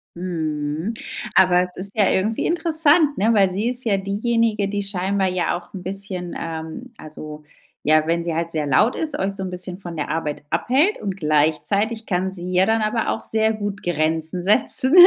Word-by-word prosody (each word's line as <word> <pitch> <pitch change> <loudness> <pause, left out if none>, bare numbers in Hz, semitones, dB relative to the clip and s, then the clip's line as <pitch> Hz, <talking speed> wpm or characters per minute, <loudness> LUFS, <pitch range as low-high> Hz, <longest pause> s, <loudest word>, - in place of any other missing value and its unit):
Mhm. 160 +1 -3 0.4
Aber 180 -1 +5
es 180 0 -8
ist 195 +2 -8
ja 205 -4 +4
irgendwie 215 +4 0
interessant, 320 -3 +2
ne, 220 +4 +3
weil 195 -3 +4
sie 205 +6 -1
ist 250 0 -4
ja 200 -3 +2
diejenige, 210 +1 0
die 205 0 -2
scheinbar 195 0 0
ja 180 -1 0
auch 175 +2 -15
'n 185 - -6
bisschen, 185 -1 -5
ähm 165 +9 -6
also, 150 0 -9 0.4
ja, 155 +1 +4
wenn 170 0 +1
sie 170 - -2
halt 165 +1 -2
sehr 155 -2 -1
laut 140 - +3
ist, 305 -2 -3
euch 195 +1 -1
so 195 - -7
'n 185 - -3
bisschen 180 +1 -6
von 175 -3 -7
der 150 - -3
Arbeit 150 -2 -3
abhält 270 - +2
und 195 -2 -3
gleichzeitig 185 +8 +1
kann 190 0 -1
sie 180 -1 -7
ja 185 +1 +4
dann 225 0 +2
aber 220 +2 0
auch 225 - -2
sehr 220 0 +2
gut 205 -2 -4
Grenzen 160 +1 -1
setzen, 260 - +5
190 Hz, 190 wpm, -22 LUFS, 170-220 Hz, 0.4 s, Aber